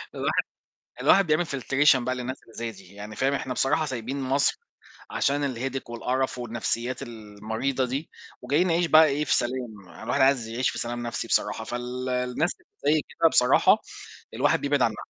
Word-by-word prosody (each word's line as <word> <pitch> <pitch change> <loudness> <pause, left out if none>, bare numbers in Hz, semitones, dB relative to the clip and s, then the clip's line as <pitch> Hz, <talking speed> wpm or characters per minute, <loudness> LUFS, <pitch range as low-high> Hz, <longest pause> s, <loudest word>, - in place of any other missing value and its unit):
الواحد - - 0 0.6
الواحد 195 -3 +5
بيعمل 155 +3 +2
filtration 140 +2 +3
بقى 130 0 -1
للناس 125 +1 -5
اللي 115 - -19
زي 115 -1 -4
دي، 95 -2 -16
يعني 105 +1 -9
فاهم 135 +5 +1
إحنا 130 -2 -2
بصراحة 145 +5 +1
سايبين 130 +1 -4
مَصر 135 - +1 0.5
عشان 140 -1 0
الheadache 135 +1 -4
والقرف 125 +2 -1
والنفْسيات 120 +1 -2
المريضة 110 +4 -3
دي، 135 +6 -4 0.3
وجايين 145 +9 +2
نعيش 170 +1 +2
بقى 160 0 +7
إيه 150 +1 0
في - - +3
سلام، 120 -6 -3
الواحد 130 +4 0
عايز 135 -4 +3
يعيش 120 +3 0
في - - -6
سلام 120 0 -3
نفْسي 115 - -3
بصراحة، - - 0
فال 125 +1 -4
الناس 125 +6 0 0.3
اللي 150 +2 +4
زّي 155 - +2
كده 165 - +3
بصراحة 125 -3 +5 0.6
الواحد - - +2
بيبعد 140 -1 +1
عنها 110 -3 +2
130 Hz, 170 wpm, -26 LUFS, 120-140 Hz, 0.6 s, بقى